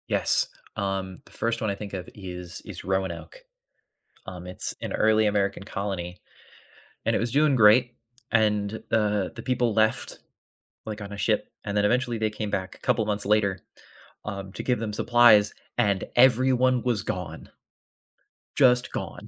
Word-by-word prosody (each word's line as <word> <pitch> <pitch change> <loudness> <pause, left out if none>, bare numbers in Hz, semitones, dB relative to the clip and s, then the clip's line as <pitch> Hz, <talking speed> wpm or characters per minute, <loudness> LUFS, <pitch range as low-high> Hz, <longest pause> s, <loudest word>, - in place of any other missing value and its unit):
Yes, - - +2 0.3
um, 95 -2 -3
the - - -19
1st 115 0 -2
one 110 - 0
I 100 - -1
think 100 0 -8
of 95 -2 -5
is 90 -3 -7
is - - -8
Roanoke. 95 - -3 0.9
Um, 90 -1 -8
it's 90 - -4
an - - -4
early 110 0 +3
American 100 -1 0
colony, 95 -3 -4 0.9
and - - +2
it - - +1
was 115 +1 -1
doing 145 +1 +3
great, 120 +2 +5 0.4
and, 105 -2 +2 0.2
uh, 105 -3 +1
the - - -7
people 125 -3 +1
left, 110 0 +1 0.7
like, 110 -1 -6
on 100 0 -7
a - - -7
ship, - - 0
and 100 0 -3
then 105 - +3
eventually 120 +1 +1
they 110 -1 0
came 105 0 -4
back 95 -1 -3
a - - -17
couple 120 -3 +1
months 105 -1 -1
later, 100 -3 +2 0.7
um, 100 -2 -6
to - - -6
give 125 -3 0
them 110 -1 -3
supplies 115 -2 +5 0.2
and 100 -2 +2
everyone 130 0 +4
was 120 -6 0
gone. 85 -3 -5 1.0
Just 125 -3 +4
gone. - - -6
105 Hz, 160 wpm, -26 LUFS, 100-115 Hz, 1.0 s, great